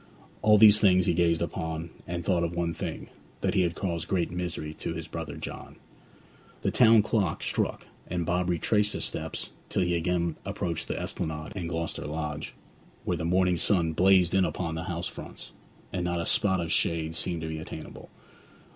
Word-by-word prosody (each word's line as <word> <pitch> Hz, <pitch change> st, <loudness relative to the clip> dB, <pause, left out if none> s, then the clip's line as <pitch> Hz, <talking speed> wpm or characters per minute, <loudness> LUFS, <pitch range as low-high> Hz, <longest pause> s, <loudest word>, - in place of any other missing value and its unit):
All 105 Hz, 0 st, +6 dB
these 105 Hz, 0 st, +8 dB
things 95 Hz, -3 st, +5 dB
he 90 Hz, -, +3 dB
gazed 85 Hz, -1 st, +2 dB
upon, 80 Hz, 0 st, -4 dB, 0.2 s
and 85 Hz, -1 st, -4 dB
thought 90 Hz, -2 st, +2 dB
of 85 Hz, 0 st, -2 dB
one 85 Hz, -1 st, 0 dB
thing -, -, -5 dB, 0.3 s
that -, -, +1 dB
he 95 Hz, -, +3 dB
had 85 Hz, -2 st, 0 dB
caused 85 Hz, -3 st, -2 dB
great 90 Hz, -3 st, 0 dB
misery 85 Hz, -3 st, -4 dB
to 85 Hz, -, -4 dB
his 80 Hz, -1 st, -5 dB
brother 80 Hz, 0 st, -6 dB
John. -, -, -7 dB, 0.9 s
The -, -, +1 dB
town 115 Hz, -3 st, +6 dB
clock 100 Hz, -7 st, 0 dB
struck, -, -, -1 dB, 0.2 s
and 85 Hz, -1 st, -2 dB
Bob 90 Hz, +2 st, 0 dB
retraced 105 Hz, +5 st, +2 dB
his -, -, -1 dB
steps -, -, -3 dB, 0.2 s
till 95 Hz, -, +1 dB
he 90 Hz, 0 st, +1 dB
again 85 Hz, -1 st, 0 dB
approached 85 Hz, -2 st, -3 dB
the -, -, -3 dB
Esplanade 75 Hz, -1 st, -4 dB
and 85 Hz, -4 st, -3 dB
Gloucester 85 Hz, -2 st, -3 dB
Lodge, 75 Hz, -1 st, -4 dB, 0.5 s
where -, -, 0 dB
the 80 Hz, -, -3 dB
morning 90 Hz, +1 st, +3 dB
sun 85 Hz, -3 st, +2 dB
blazed 90 Hz, 0 st, +4 dB
in 95 Hz, 0 st, +4 dB
upon 85 Hz, -2 st, -2 dB
the 80 Hz, +1 st, -4 dB
house 85 Hz, 0 st, -3 dB
fronts, -, -, -9 dB, 0.4 s
and 90 Hz, -1 st, -1 dB
not 85 Hz, 0 st, -1 dB
a 85 Hz, -, -2 dB
spot 95 Hz, -2 st, +3 dB
of 85 Hz, -1 st, -2 dB
shade 80 Hz, -1 st, 0 dB
seemed 85 Hz, 0 st, -2 dB
to -, -, -3 dB
be 80 Hz, 0 st, -4 dB
attainable. 80 Hz, 0 st, -9 dB
85 Hz, 190 wpm, -28 LUFS, 80-90 Hz, 0.9 s, these